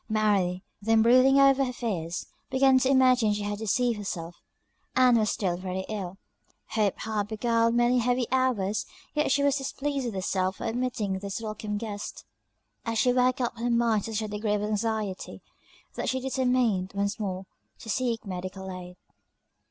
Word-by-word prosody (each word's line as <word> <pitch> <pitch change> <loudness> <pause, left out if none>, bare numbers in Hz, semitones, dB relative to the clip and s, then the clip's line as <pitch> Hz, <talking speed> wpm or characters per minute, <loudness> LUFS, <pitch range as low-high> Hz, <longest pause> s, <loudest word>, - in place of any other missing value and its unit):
Mary, 200 -4 +1 0.2
then 220 +1 +4
brooding 255 +3 +6
over 275 0 +5
her 255 - -1
fears, 185 -9 -3 0.2
began 265 0 +4
to 260 - +1
imagine 255 -5 +4
she 205 0 -3
had 205 0 -3
deceived 230 +1 +1
herself 175 -4 -6 0.5
Ann 255 -1 +6
was 215 -2 +2
still 180 -4 -1
very 185 +1 -3
ill; 195 -3 -4 0.5
hope 210 -3 +1
had 215 -2 -2
beguiled 230 +1 +1
many 240 +1 +3
heavy 245 +1 +1
hours; 240 -6 +1 0.3
yet 300 -2 +1
she 280 +1 +3
was 280 0 +3
displeased 275 -1 -2
with 225 - -4
herself 190 0 0
for - - -8
admitting 225 -5 -1
this 200 +1 -4
welcome 215 -1 -4
guest. 205 -2 -6 0.6
And 230 -1 -2
she 250 +2 +3
worked 255 0 +2
up 240 -1 -1
her 240 +1 -1
mind 235 -3 +2
to 225 - -5
such 220 - 0
a - - -3
degree 210 0 -1
of 205 - -2
anxiety, 210 -2 -2 0.5
that - - -2
she 260 - 0
determined, 250 -7 +1
once 200 +3 -1
more, 190 -2 -3 0.3
to - - -13
seek 230 0 -1
medical 190 0 -6
aid. 180 -1 -8
220 Hz, 170 wpm, -27 LUFS, 200-250 Hz, 0.6 s, brooding